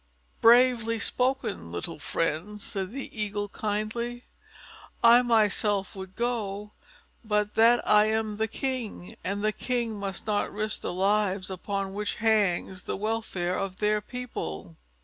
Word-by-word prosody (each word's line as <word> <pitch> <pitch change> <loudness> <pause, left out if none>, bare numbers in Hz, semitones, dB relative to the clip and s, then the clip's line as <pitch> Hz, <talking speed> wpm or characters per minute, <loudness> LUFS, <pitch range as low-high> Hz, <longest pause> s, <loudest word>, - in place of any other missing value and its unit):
"Bravely 235 -1 +5
spoken, 250 - -1
little 85 - -5
friend," 165 +7 -2
said 195 -2 -3
the 270 +5 -7
Eagle 205 -1 -2
kindly. 220 +4 -3 0.8
"I 235 +1 +8
myself 210 -3 +2
would 190 -1 -8
go 210 -4 -2 0.5
but 210 -1 0
that 235 +2 +5
I 210 0 +6
am 220 -1 -1
the 220 +1 +1
King, 240 -6 -4
and 200 +2 -2
kings 240 -3 -1
must 200 -3 -5
not 210 -1 0
risk 215 +1 -2
the - - -3
lives 195 0 +1
upon 195 +1 -3
which 210 +1 -2
hangs 205 -4 +1
the - - -2
welfare 205 -4 -1
of 190 -1 -3
their 210 0 +1
people. 150 - -6
210 Hz, 130 wpm, -27 LUFS, 195-230 Hz, 0.8 s, I